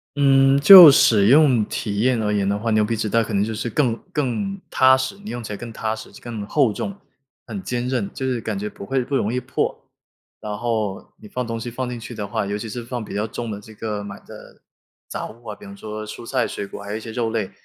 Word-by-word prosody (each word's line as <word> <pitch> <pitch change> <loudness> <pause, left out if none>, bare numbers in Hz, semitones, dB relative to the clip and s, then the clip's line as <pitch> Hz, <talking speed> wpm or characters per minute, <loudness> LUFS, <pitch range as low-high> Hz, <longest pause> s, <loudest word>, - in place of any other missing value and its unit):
嗯， 135 -1 +4
就 175 +1 +12
使 105 -6 +5
用 135 -4 +5
体 100 -2 -4
验 120 -1 +2
而 105 0 0
言 100 -1 0
的 100 - 0
话， 115 +2 -2
牛 110 0 +3
皮 115 +2 -1
纸 110 - -1
袋 115 +1 +2
可 110 - -7
能 100 0 +2
就 110 +1 -3
是 115 +2 -3
更 120 -2 +1 0.2
更 170 - -2
踏 130 0 +5
实， 130 +9 -3
你 - - -7
用 120 -1 -5
起 105 - -6
来 - - -5
更 120 -1 -8
踏 110 0 -3
实、 - - -11
就 - - -14
更 110 -4 -6
厚 130 -6 +2
重， 200 - -5 0.5
很 195 - -6
坚 125 -5 -3
韧， 125 -6 -1
就 135 -1 -4
是 125 -3 -1
感 105 -2 -3
觉 105 +2 -4
不 100 - -9
会 130 +1 0
不 140 +1 -2
容 110 -3 0
易 125 - 0
破。 125 +1 -3 0.6
然 105 -1 -5
后 110 -4 -3
你 105 - -11
放 125 +3 -4
东 115 0 -4
西 120 +2 -5
放 125 +2 -4
进 120 -1 -5
去 120 +1 -9
的 105 -2 -5
话， 100 - -2
尤 100 +1 -2
其 110 - -6
是 120 +2 -6
放 120 -2 -5
比 - - -9
较 105 +2 -1
重 115 +1 -5
的 100 0 -6
这 110 +1 -14
个 105 -2 -4
买 100 0 -8
的 - - -14 0.5
杂 - - -5
物 115 +2 -16
啊， - - -7
比 - - -17
方 100 0 -11
说 110 0 -7
蔬 115 - -8
菜、 130 +1 0
水 100 - -5
果， 100 - -9
还 100 0 -7
有 110 - -2
一 - - -6
些 110 0 -8
肉 115 0 -1
类， 105 -4 -2
115 Hz, 290 characters per minute, -22 LUFS, 105-130 Hz, 0.6 s, 就